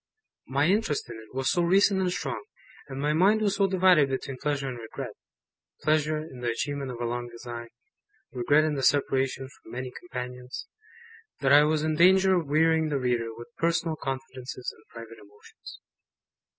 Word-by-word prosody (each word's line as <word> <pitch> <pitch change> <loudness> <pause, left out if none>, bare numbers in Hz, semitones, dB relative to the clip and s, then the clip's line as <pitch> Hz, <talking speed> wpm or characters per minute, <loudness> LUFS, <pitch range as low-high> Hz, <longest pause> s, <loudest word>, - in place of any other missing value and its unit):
My 140 +2 +1
interest 185 -4 +1
in - - -7
it 110 -1 -13
was 135 0 +1
so 175 - +2
recent 190 +2 +4
and 180 -1 +1
strong, 185 - -3 0.4
and 135 -1 -7
my 145 +2 +1
mind 195 +7 +4
was 205 -2 0
so 200 -1 +3
divided 180 -6 +4
between 130 0 -4
pleasure 145 -2 -1
and 125 -2 -5
regret 110 -1 -7 0.7
pleasure 155 0 +2
in 155 -5 -8
the 120 -1 -1
achievement 140 +4 -3
of 120 -2 -6
a 120 - -2
long 120 +1 -3
design, 120 0 -8 0.6
regret 145 +4 +3
in 155 -1 0
the 140 - -2
separation 135 -1 +1
from 130 - -17
many 130 0 -5
companions 125 -6 -7 0.8
that 135 0 +4
I 145 +1 +8
was 155 0 +1
in 155 0 +1
danger 190 +2 +6
of 170 -5 -1
wearying 160 +1 +3
the 145 - 0
reader 120 -3 0
with 120 +4 -10
personal 165 -1 +1
confidences 130 -2 -5
and 110 - -22
private 115 -1 -11
emotions. 105 0 -14
140 Hz, 175 wpm, -27 LUFS, 125-160 Hz, 0.8 s, I